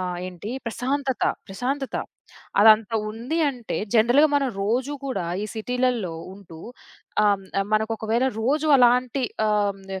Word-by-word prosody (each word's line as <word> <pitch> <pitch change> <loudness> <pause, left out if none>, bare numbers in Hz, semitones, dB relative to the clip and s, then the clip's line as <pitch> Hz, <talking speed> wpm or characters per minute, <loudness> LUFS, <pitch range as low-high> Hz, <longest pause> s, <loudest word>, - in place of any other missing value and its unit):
ఆహ్, 180 -1 -3
ఏంటి? 185 +4 -8 0.2
ప్రశాంతత, 265 +3 -2 0.3
ప్రశాంతత. 265 +7 -3 0.7
అదంత 215 0 +6 0.2
ఉంది 240 +9 -3
అంటే 245 -4 -6 0.2
జనరల్‌గా 240 +7 +5
మనం 275 -2 +1
రోజు 245 +7 0
గూడా 225 -11 -3 0.2
ఈ - - -4
సిటీలల్లో 245 -5 -1 0.2
ఉంటూ 180 -5 -13 0.7
ఆహ్, 205 -1 +3 0.2
హ్మ్. 195 - +1
మనకు 220 +1 +1
ఒకవేళ 225 +4 0
రోజు 300 +6 +1
అలాంటి 250 +1 +3 0.2
ఆహ్, 205 -1 +2
హ్మ్. 190 0 -7
230 Hz, 130 wpm, -24 LUFS, 205-260 Hz, 0.7 s, అదంత